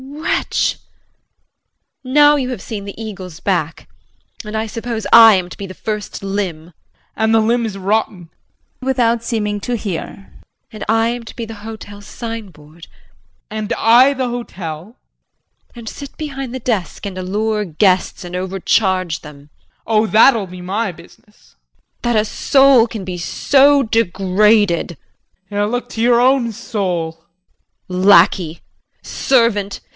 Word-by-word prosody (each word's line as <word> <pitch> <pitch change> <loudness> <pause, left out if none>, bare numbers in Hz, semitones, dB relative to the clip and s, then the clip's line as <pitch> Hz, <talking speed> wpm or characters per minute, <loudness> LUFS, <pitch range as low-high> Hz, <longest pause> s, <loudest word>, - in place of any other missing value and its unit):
JULIE. 280 +3 -10
Wretch! - - 0 1.3
Now 290 +3 +5
you 260 -3 -2
have 250 -7 -5
seen 205 -1 -6
the 200 +1 -9
eagle's 185 -6 -8
back, 170 -5 -2 0.6
and 210 0 -5
I 220 - -1
suppose 225 0 -5
I 225 -2 +9
am 185 -2 -1
to - - -11
be 200 - -6
the 185 - -10
first 210 -2 -5
limb 195 -5 -3
JEAN. 175 - -19 0.4
And 220 0 +2
the - - +5
limb 230 +2 +1
is 200 -2 -6
rotten 195 -3 -1 0.5
JULIE 260 - -8
[Without 235 -3 +1
seeming 210 -3 -2
to 245 +3 -2
hear]. 195 -2 -6 0.4
And 215 - -8
I 225 +1 +3
am 240 0 -4
to - - -11
be 230 - -5
the 225 - -8
hotel's 205 -2 -9
signboard 185 -9 -9
JEAN. - - -22
And 215 -1 -3
I 245 +5 +5
the 260 -2 -2
hotel 185 -10 -6
JULIE. 220 +8 -25
And 235 -2 -10
sit 280 -1 -10
behind 270 -4 -5
the - - -4
desk 215 -6 -3
and 195 -2 -5
allure 210 +3 -1
guests 185 +2 +1
and 175 0 -7
overcharge 185 -1 0
them 150 -2 -11 0.2
JEAN. - - -40 0.2
Oh, 220 -1 +2
that'll 220 -1 +4
be 180 0 -10
my 200 +3 -2
business. - - -20 0.5
JULIE. 240 - +1
That 215 - +3
a - - -4
soul 270 0 +4
can 220 -4 -7
be 180 -1 -5
so 280 +9 +3
degraded! 205 - +2 0.5
JEAN. 205 0 0
Look 245 +2 -3
to 225 - -5
your 235 0 +4
own 255 -1 +3
soul. 180 -8 -3 0.6
JULIE. 185 0 -3
Lackey! 170 -3 +4 0.4
Servant! 230 -6 +1
215 Hz, 155 wpm, -17 LUFS, 185-235 Hz, 1.3 s, I